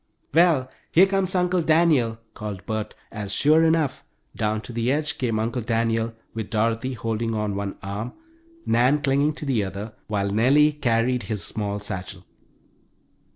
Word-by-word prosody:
"Well, 165 -6 +4 0.2
here 180 +4 +7
comes 195 -1 0
Uncle 180 0 +2
Daniel!" 155 -8 +3 0.2
called 100 -3 -6
Bert, 110 -2 -3 0.2
as, 105 -2 -4
sure 155 +3 +5
enough, 160 -4 +1 0.3
down 110 0 -1
to 120 - -9
the 120 +2 0
edge 150 +1 -1
came 115 -4 0
Uncle 115 +3 -1
Daniel 115 0 0 0.2
with 110 -2 -5
Dorothy 115 +3 0
holding 115 -1 -2
on 105 -2 -1
one 100 -1 -3
arm, 100 +4 -4 0.5
Nan 130 +5 +3
clinging 140 +2 +2
to 150 - -5
the 125 -7 +1
other, 100 +3 -6
while 100 -2 -1
Nellie 135 +8 +4
carried 125 -3 +1
his 105 -3 -2
small 105 -1 -3
satchel. 95 -2 -6
115 Hz, 155 wpm, -24 LUFS, 105-145 Hz, 0.5 s, here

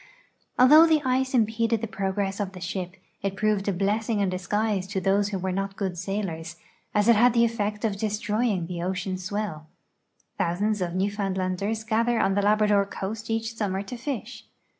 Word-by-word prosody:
Although 305 +6 +8
the 310 -2 +3
ice 260 +1 +1
impeded 230 0 +2
the 230 - -2
j^rogress 195 0 -2
of 195 -2 -3
the 185 - -9
sliip, 180 0 -4 0.3
it 195 -1 -3
])roved 210 -2 +1
a - - +3
blessing 205 +4 0
in 200 -2 +1
disguise 195 +1 -1
to 195 0 -2
those 200 +2 +2
who 200 - -2
were 190 0 -2
not 195 +1 -3
good 190 -3 -2
sailors, 175 -3 -4 0.4
as 210 +1 +3
it 235 - +7
had 240 +3 +5
the 235 0 +5
effect 210 -2 -2
of 205 -3 -1
destroying 210 -2 0
the 170 0 -5
ocean 185 +1 -2
swell. 185 -5 -4 0.7
Tlu)usands 205 +4 0
of 175 0 -4
Newfoundlanders 195 +1 -1
gather 230 +1 +1
on 195 -1 +2
the 205 - +2
Labrador 210 0 +3
coast 210 +3 -5
each 225 0 -1
suinnu 210 -4 -2
r 190 +1 -2
to 200 +5 -7
fish. 255 0 -6
205 Hz, 180 wpm, -26 LUFS, 190-220 Hz, 0.7 s, Although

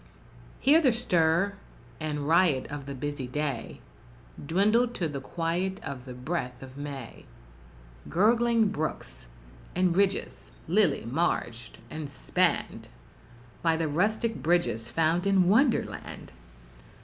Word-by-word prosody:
Here 300 +5 +5
the 260 -6 +4
stir 180 -4 +2 0.5
and 150 -2 -3
riot 165 -5 +3
of 145 -1 -6
the 140 - -5
busy 145 -1 -4
day, 140 -2 -4 0.6
Dwindled 215 - +2
to 170 - -1
the 140 -3 -5
quiet 175 +6 -2
of 130 - -6
the 125 -2 -8
breath 125 -1 -4
of 130 0 -11
May; 140 -4 -7 0.8
Gurgling 230 +3 +3
brooks, 155 - -5 0.5
and 180 -1 +2
ridges 195 0 0 0.2
lily 190 - +2
marged, 120 -4 -2
and 155 -2 -5
spanned 140 - -1 0.7
By 165 -1 +2
the 165 -1 0
rustic 215 +8 0
bridges 165 -9 +1
found 165 +5 +1
in 190 -2 +4
Wonderland! 235 +6 +1
165 Hz, 115 wpm, -28 LUFS, 140-200 Hz, 0.8 s, Here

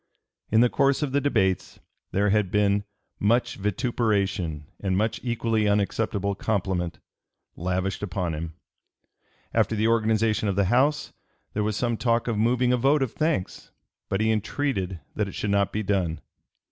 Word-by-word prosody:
In 110 +1 +4
the 120 - +5
course 140 +1 +2
of 145 - -1
the 140 +1 +2
debates 95 -10 0 0.3
there 100 +1 +2
had 105 -2 +2
been 100 0 +2 0.3
"much 120 +3 +2
vituperation 100 - -1
and 95 -2 0
much 110 +2 0
equally 115 -3 0
unacceptable 100 0 0
compliment" 95 -4 -1 0.6
lavished 90 +2 -2
upon 90 -4 -2
him. 80 +1 -5 1.0
After 115 - +2
the 110 +1 +2
organization 110 -1 +2
of 100 - -1
the 100 0 +2
House, 145 +4 +2 0.4
there 105 - -1
was 105 0 -1
some 120 -2 0
talk 115 0 +1
of 115 - 0
moving 125 +2 +2
a - - +3
vote 135 +3 +3
of 125 - -2
thanks, 155 - -2 0.4
but 100 +1 0
he 110 0 +3
entreated 105 - -1 0.2
that 105 -2 0
it 100 - -8
should 105 - -2
not 100 -1 +2
be 110 - -2
done. 95 -5 0
105 Hz, 160 wpm, -25 LUFS, 95-115 Hz, 1.0 s, the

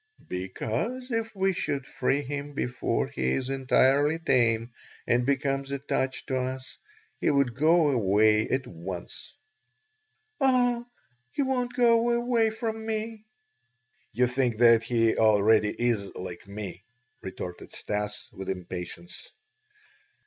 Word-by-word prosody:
"Because 115 - -3
if 225 -1 -1
we 190 0 +2
should 140 -6 -2
free 135 +3 0
him 145 +1 -5
before 125 -2 -1
he 65 0 -1
is 130 0 -2
entirely 135 +3 +3
tame 120 -7 +2 0.3
and 120 +1 +2
becomes 135 -1 0
attached 135 -1 -2
to 130 -2 -1
us, 130 +1 -4 0.4
he - - +1
would 140 -4 +2
go 155 +3 +4
away 110 -2 +3
at 130 0 -1
once." 90 +1 -8 1.0
"Oh! 245 -3 +2 0.5
He 285 - +1
won't 250 -2 -1
go 235 -1 +4
away 240 -2 +2
from 220 0 -4
me." 220 0 -4 0.9
"You 125 +4 +2
think 125 -2 0
that 115 -1 +6
he 115 -1 +2
already 110 0 +4
is 115 -4 -1
like 90 +1 -7
me," 100 -2 -7 0.4
retorted 90 -1 -7
Stas 105 0 -4
with 95 - -7
impatience. 95 - -6
130 Hz, 120 wpm, -27 LUFS, -, 1.0 s, that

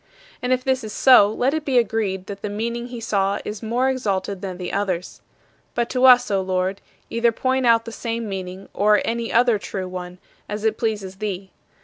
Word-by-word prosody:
And 250 - -1
if 255 0 +2
this 260 -1 0
is 215 - -6
so, 250 -6 +6
let 250 +5 0
it 315 -1 -1
be 270 -4 +1
agreed 205 -5 0
that 200 0 -8
the 210 - -3
meaning 235 +3 -3
he 245 -1 -7
saw 200 -3 0
is 210 0 -5
more 240 +3 0
exalted 200 -7 -1
than 185 -2 -5
the 180 -1 -5
others. 185 -3 -2 0.5
But 235 -1 -1
to 255 0 +3
us, 250 -3 +7
O 195 -1 +2
Lord, 185 +1 -1 0.3
either 230 0 +2
point 260 +2 0
out 230 -1 +4
the 230 - -6
same 230 0 -4
meaning 190 -1 -6
or 210 +1 +4
any 230 0 -2
other 235 -2 +4
true 190 -2 -5
one, 180 0 -7 0.3
as 210 +1 -4
it 220 -1 +1
pleases 205 -4 -2
thee. 195 -2 -4
215 Hz, 205 wpm, -22 LUFS, 195-240 Hz, 0.5 s, us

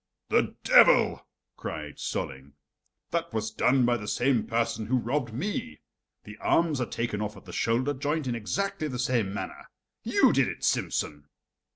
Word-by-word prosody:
"The - - +2
devil!" - - +5 0.3
cried - - -6
Solling. 65 +1 -4 0.6
"That 170 0 -1
was 110 0 -2
done 125 +3 +3
by 120 0 +2
the 105 -2 -8
same 120 +1 +1
person 115 -1 -1
who 130 - +2
robbed 120 0 -1
me; 130 - -4 0.4
the 105 0 -11
arms 160 -1 +2
are 125 - -1
taken 115 -3 -2
off 105 0 -4
at - - -14
the - - -10
shoulder 125 +5 +1
joint 145 +2 -2
in 125 - -1
exactly 155 - -2
the 130 -4 -4
same 120 -5 0
manner. 100 - -6 0.3
You - - +4
did - - +3
it, - - -6
Simsen!" 75 -1 -1
120 Hz, 165 wpm, -28 LUFS, 110-140 Hz, 0.6 s, devil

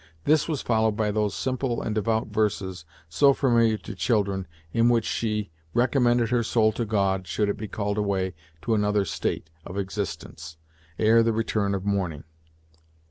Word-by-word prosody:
This 155 0 +3
was 155 -4 -2
followed 110 -2 +1
by 105 -1 +1
those 105 -2 0
simple 130 -2 -1
and 110 - -2
devout 110 +1 0
verses, 100 -5 -1 0.2
so 140 - +4
familiar 115 -4 +3
to - - -8
children, 100 -5 0 0.3
in 115 +1 +4
which 115 -2 +2
she 105 -4 -2 0.2
recommended 120 -2 +3
her 120 -1 +3
soul 110 -1 +2
to 115 +2 -3
God, 95 -3 0
should 105 - 0
it - - -1
be 110 - -5
called 105 0 -2
away 95 -3 0 0.3
to 115 - +1
another 105 -1 +2
state 80 -2 -3
of 90 - -8
existence, 95 -5 -5 0.4
ere 110 +1 +5
the 115 0 +2
return 105 -3 0
of 95 0 -4
morning. 95 -7 -1
105 Hz, 165 wpm, -25 LUFS, 100-115 Hz, 0.4 s, ere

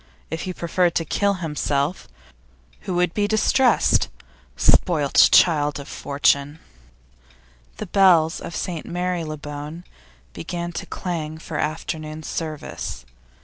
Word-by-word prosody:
If 160 - -3
he - - -3
preferred 175 +1 +1
to 165 - 0
kill 200 +5 +1
himself, 150 -2 -2 0.8
who 180 - -1
would 175 -1 +1
be 205 -1 +1
distressed? 235 +4 +3 0.5
Spoilt 150 -6 +4
child 150 -4 +4
of 140 - -9
fortune! 140 +1 0 1.2
The - - -5
bells 175 -4 +4
of 170 - -7
St 170 -4 -4
Marylebone 160 -3 -4 0.5
began 170 - -5
to - - -6
clang 160 -4 -4
for 160 -1 -6
afternoon 155 0 -4
service. 150 - -5
160 Hz, 110 wpm, -22 LUFS, 150-180 Hz, 1.2 s, Spoilt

